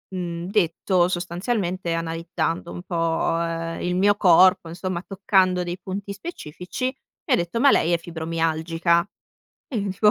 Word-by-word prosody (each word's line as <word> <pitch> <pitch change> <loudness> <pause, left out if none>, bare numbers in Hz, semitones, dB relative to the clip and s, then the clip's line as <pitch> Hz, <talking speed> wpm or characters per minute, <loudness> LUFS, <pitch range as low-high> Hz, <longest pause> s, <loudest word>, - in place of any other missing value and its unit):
mhmm, 170 -2 -4
detto 180 -2 +2
sostanzialmente, 180 0 -2
analizzando 165 0 -2
un 175 - -7
po', 165 -2 0
ehm, 165 0 -3
il 180 0 -1
mio 205 +2 +4
corpo, 185 -3 +5
insomma 180 +1 -4
toccando 190 -2 +2
dei 175 0 -4
punti 200 +2 -5
specifici, 195 - -6
mi 260 +1 -4
ha - - +7
detto: 175 +6 -2
"Ma 280 +3 +6
lei 165 - +3
è 170 - +4
fibromialgica," 165 0 0 0.7
e 255 - -4
io 200 -1 -2
dico 200 +3 +3
175 Hz, 150 wpm, -23 LUFS, 165-190 Hz, 0.7 s, ha